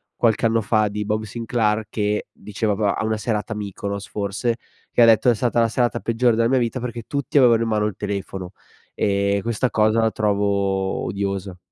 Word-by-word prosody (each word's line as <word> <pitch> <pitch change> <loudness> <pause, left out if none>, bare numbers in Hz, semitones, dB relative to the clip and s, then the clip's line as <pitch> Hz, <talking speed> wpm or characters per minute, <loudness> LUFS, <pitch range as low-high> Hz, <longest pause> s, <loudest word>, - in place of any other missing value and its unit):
qualche 115 -1 +2
anno 115 0 +1
fa 110 +1 +2
di 105 0 -4
Bob 110 +1 -1
Sinclair 110 -1 -1
che 105 0 -1
diceva 105 0 -2
po 105 0 0
a 110 - 0
una 110 0 0
serata 105 0 -2
a - - -7
Mykonos 100 -1 -5
forse, 105 +3 -2 0.3
che - - +2
ha - - +8
detto: 115 +2 +5
"È 120 - +4
stata 120 +1 0
la 115 - +4
serata 120 0 0
peggiore 115 0 +2
della 115 +1 +2
mia 130 - +3
vita 120 +1 -1
perché 120 -2 -5
tutti 140 +4 -2
avevano 120 -4 +6
in 115 - 0
mano 105 -1 +1
il 105 -3 -2
telefono 100 -3 -5 0.4
e 100 0 +1
questa 115 +2 0
cosa 110 +1 +2
la 110 - +3
trovo 100 -2 0
odiosa." 100 -2 -3
110 Hz, 200 wpm, -22 LUFS, 100-115 Hz, 0.4 s, ha